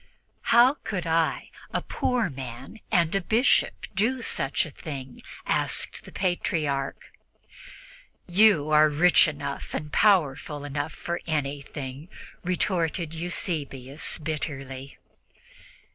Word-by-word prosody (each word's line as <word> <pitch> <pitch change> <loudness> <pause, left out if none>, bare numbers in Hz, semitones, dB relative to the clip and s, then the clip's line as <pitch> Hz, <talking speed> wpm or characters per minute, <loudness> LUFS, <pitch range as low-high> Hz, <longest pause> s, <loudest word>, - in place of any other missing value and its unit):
"How 245 +5 +6
could 185 -5 -3
I, 165 -1 0 0.2
a - - -1
poor 250 -3 0
man 130 - -8
and 170 -1 +3
a 195 - +2
Bishop, 225 +8 +2
do 230 +6 +1
such 135 - 0
a 155 - -9
thing?" 135 -4 -8 0.2
asked - - 0
the - - -11
Patriarch. 155 -7 -1 1.1
"You 175 -5 +4
are 155 0 +6
rich 170 +5 +5
enough 140 -2 -5
and 150 0 -5
powerful 150 -7 +2
enough 145 +2 -3
for 170 0 -4
anything," 145 -1 -4 0.3
retorted 170 -3 0
Eusebius 155 -5 -3
bitterly. 140 -3 -5
155 Hz, 105 wpm, -26 LUFS, 140-180 Hz, 1.1 s, How